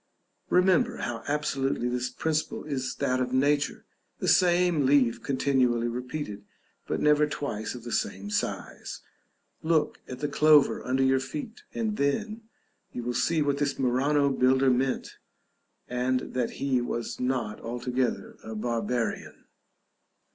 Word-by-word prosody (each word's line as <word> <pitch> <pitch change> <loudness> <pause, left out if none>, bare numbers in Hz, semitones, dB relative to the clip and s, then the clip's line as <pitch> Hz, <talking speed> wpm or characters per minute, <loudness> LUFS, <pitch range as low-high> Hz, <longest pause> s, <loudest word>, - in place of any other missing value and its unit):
Remember 190 +7 +3
how 115 -2 -4
absolutely 135 -4 0
this 125 0 -1
principle 155 +2 -2
is 130 -4 -3
that 130 -2 0
of 125 -1 -1
nature; 140 +2 +1 0.3
the - - -3
same 175 -3 +4
leaf 130 -4 +3
continually 130 -4 +1
repeated, 125 -3 -5 0.4
but - - -1
never 150 0 +4
twice 125 -7 -4
of 120 - -9
the 120 - -7
same 100 0 -2
size. - - -3 0.6
Look 160 -1 +1
at 125 - -6
the 145 - -2
clover 150 0 +4
under 130 +1 +1
your 130 0 +4
feet, 230 - -6
and 220 -2 -1
then 215 +11 -1 0.5
you 120 - -5
will 120 +1 -2
see 160 +5 +1
what 140 -1 0
this 145 -1 0
Murano 140 +3 +2
builder 130 0 +3
meant, 130 +1 -1 0.7
and 125 +1 -1
that 125 -2 -1
he 130 -3 +1
was 120 -1 -4
not 125 -4 -1
altogether 125 +1 -2
a 110 0 -7
barbarian. 115 +1 -2
130 Hz, 135 wpm, -27 LUFS, 125-150 Hz, 0.7 s, same